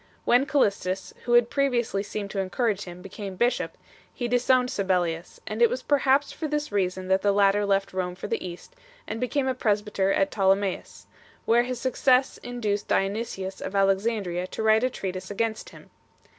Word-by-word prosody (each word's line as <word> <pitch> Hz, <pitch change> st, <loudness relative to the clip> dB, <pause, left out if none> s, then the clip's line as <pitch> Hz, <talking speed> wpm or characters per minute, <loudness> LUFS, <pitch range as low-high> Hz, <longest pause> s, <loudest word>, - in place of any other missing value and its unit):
When 250 Hz, +3 st, +4 dB
Callistus, 195 Hz, -9 st, 0 dB
who 240 Hz, -, +1 dB
had 240 Hz, -1 st, +5 dB
previously 245 Hz, -8 st, +1 dB
seemed 200 Hz, 0 st, -5 dB
to 200 Hz, -, -3 dB
encourage 205 Hz, +2 st, -1 dB
him, 180 Hz, 0 st, -10 dB
became 195 Hz, 0 st, -7 dB
bishop, 240 Hz, +6 st, 0 dB, 0.3 s
he 240 Hz, -, -3 dB
disowned 250 Hz, +1 st, +2 dB
Sabellius, 180 Hz, -6 st, -1 dB
and 215 Hz, +2 st, -4 dB
it 235 Hz, -, +7 dB
was 255 Hz, 0 st, -3 dB
perhaps 280 Hz, 0 st, +2 dB
for 315 Hz, -, -4 dB
this 295 Hz, -2 st, -2 dB
reason 185 Hz, -2 st, -1 dB
that 190 Hz, 0 st, +3 dB
the 205 Hz, -, +3 dB
latter 200 Hz, 0 st, +3 dB
left 195 Hz, -1 st, +1 dB
Rome 180 Hz, -1 st, -2 dB
for 185 Hz, -, -8 dB
the 225 Hz, +2 st, -2 dB
East 180 Hz, -, -9 dB, 0.3 s
and 225 Hz, +2 st, -5 dB
became 260 Hz, +2 st, 0 dB
a 260 Hz, -, +1 dB
presbyter 210 Hz, -4 st, 0 dB
at 195 Hz, -, +1 dB
Ptolemais, 195 Hz, -1 st, 0 dB, 0.4 s
where 235 Hz, +1 st, +4 dB
his 250 Hz, -1 st, -4 dB
success 260 Hz, 0 st, +2 dB
induced 215 Hz, -4 st, -3 dB
Dionysius 195 Hz, -1 st, -2 dB
of 200 Hz, -, -5 dB
Alex 195 Hz, +1 st, +3 dB
andria 185 Hz, -6 st, -2 dB
to -, -, -4 dB
write 220 Hz, +1 st, +4 dB
a 255 Hz, -, +3 dB
treatise 185 Hz, -5 st, -5 dB
against 220 Hz, +2 st, -2 dB
him. -, -, -16 dB
205 Hz, 180 wpm, -26 LUFS, 195-245 Hz, 0.4 s, it